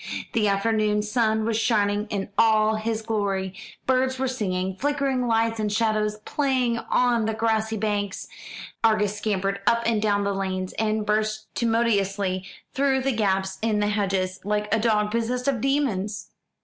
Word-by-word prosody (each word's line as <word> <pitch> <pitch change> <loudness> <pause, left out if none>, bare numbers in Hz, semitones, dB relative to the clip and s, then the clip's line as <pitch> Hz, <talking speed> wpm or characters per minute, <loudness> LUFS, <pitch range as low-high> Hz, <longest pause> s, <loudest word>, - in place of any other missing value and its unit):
The 220 -2 +2
afternoon 210 +1 +1
sun 220 0 +1
was 225 -1 0
shining 210 -2 +1
in 200 -1 -3
all 220 0 +4
his 220 0 -2
glory, 200 -4 -1 0.3
birds 260 0 +1
were 265 +1 0
singing, 190 -7 -2
flickering 275 -2 0
lights 225 0 +1
and 210 -1 -1
shadows 215 -1 +1
playing 255 -5 0
on 240 -3 +2
the 220 0 -1
grassy 220 0 0
banks. 205 -2 -2 0.6
Argus 210 -2 +3
scampered 200 -2 -1
up 235 0 +3
and 225 -2 +1
down 205 -1 +1
the 200 0 0
lanes, 185 -1 -3
and 215 -1 0
burst 215 0 -1
tumultuously 200 -5 0 0.3
through 270 -1 +1
gaps 190 -4 0
in 220 -1 +1
the 205 0 +1
hedges, 190 -3 -1
like 210 +1 -1
a 220 - +3
dog 210 -2 +1
possessed 240 +3 -1
of 260 -5 +1
demons. 235 -8 -1
215 Hz, 150 wpm, -25 LUFS, 205-230 Hz, 0.6 s, all